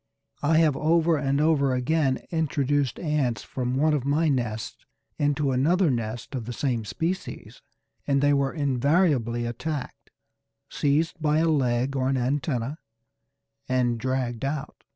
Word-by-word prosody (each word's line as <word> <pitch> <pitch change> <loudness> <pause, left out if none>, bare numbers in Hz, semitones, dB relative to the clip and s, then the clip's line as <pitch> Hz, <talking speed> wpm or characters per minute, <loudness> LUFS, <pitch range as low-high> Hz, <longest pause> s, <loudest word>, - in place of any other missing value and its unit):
I 155 +2 +3
have 160 -4 +4
over 165 +2 +2
and 140 0 0
over 145 -4 +2
again 135 +1 0
introduced 145 -5 0
ants 140 - -1
from 125 -1 -3
one 155 +3 +2
of 145 -4 0
my 150 +4 +2
nests 120 -5 -3 0.4
into 145 -1 +1
another 160 +6 +2
nest 115 +2 -4
of 125 -4 -4
the 120 - -5
same 120 -4 -1
species, 175 - -4 0.5
and 140 -1 +2
they 145 +1 +3
were 140 -1 +1
invariably 140 -4 +1
attacked, 140 +4 -5 0.6
seized 155 +4 0
by 150 0 +2
a 165 +1 +2
leg 130 -3 +1
or 130 -1 +1
an 135 - +1
antenna, 130 +2 -1 0.9
and 125 -2 +1
dragged 125 -1 -2
out. 140 +1 -4
140 Hz, 140 wpm, -25 LUFS, 125-155 Hz, 0.9 s, have